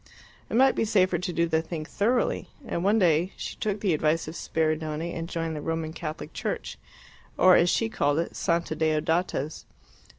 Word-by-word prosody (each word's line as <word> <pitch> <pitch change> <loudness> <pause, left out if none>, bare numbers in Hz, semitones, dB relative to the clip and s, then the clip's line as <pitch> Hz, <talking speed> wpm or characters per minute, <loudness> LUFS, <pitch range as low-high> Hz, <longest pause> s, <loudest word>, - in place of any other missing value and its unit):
It - - -3
might 265 +1 +6
be - - 0
safer 185 -5 +2
to 180 +1 -3
do 170 -1 +1
the 160 -1 +1
thing 160 -1 -5
thoroughly, 230 +9 0 0.2
and 170 - -3
one 205 +3 +3
day 175 -2 +3
she - - -5
took 205 -1 -2
the 190 -5 +2
advice 155 +1 +1
of 155 - -5
Spiridione 160 0 -2
and 165 0 -5
joined 165 -2 -3
the 150 - -4
Roman 165 0 -3
Catholic 155 -2 -6
Church, - - -4 0.6
or 185 -1 +7
as 175 - +4
she 225 - +2
called 145 -9 0
it, 165 - -2
"Santa 170 -1 0
Deodata's." 155 0 -1
165 Hz, 185 wpm, -27 LUFS, 155-185 Hz, 0.6 s, or